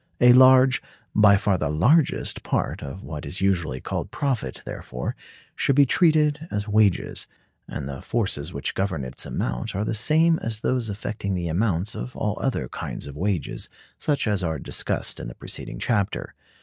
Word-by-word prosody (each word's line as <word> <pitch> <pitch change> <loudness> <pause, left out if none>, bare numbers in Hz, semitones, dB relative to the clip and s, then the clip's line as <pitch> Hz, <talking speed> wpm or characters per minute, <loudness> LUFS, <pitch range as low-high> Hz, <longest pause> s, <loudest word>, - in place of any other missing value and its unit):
A 125 0 +8
large—by 130 -5 +5
far 95 -2 +1
the 80 - 0
largest—part 130 - +1
of 70 +8 -7
what 75 -2 -6
is 90 - -3
usually 85 -9 0
called - - -4
profit, 125 - -2
therefore, 60 0 -5 0.4
should 140 - +2
be 140 0 +7
treated 155 0 +3
as 105 +1 -2
wages, 105 -3 +2 0.4
and 70 -1 -5
the 70 -1 -6
forces 95 -9 -1
which 70 -4 -3
govern 95 -8 -1
its 65 - -5
amount 60 +6 -3
are 100 +2 -1
the - - -1
same 160 +9 +3
as 110 -1 -2
those 125 -3 0
affecting 100 -1 -3
the 85 -2 -2
amounts 95 +2 0
of 125 - -6
all 105 -1 -2
other 135 - -1
kinds - - -6
of 70 -1 -8
wages, 90 +1 -2 0.3
such 145 -2 0
as 105 -4 0
are 80 -2 -1
discussed - - -3
in - - -6
the - - -8
preceding - - -6
chapter. 105 -5 -1
105 Hz, 165 wpm, -24 LUFS, 80-125 Hz, 0.4 s, A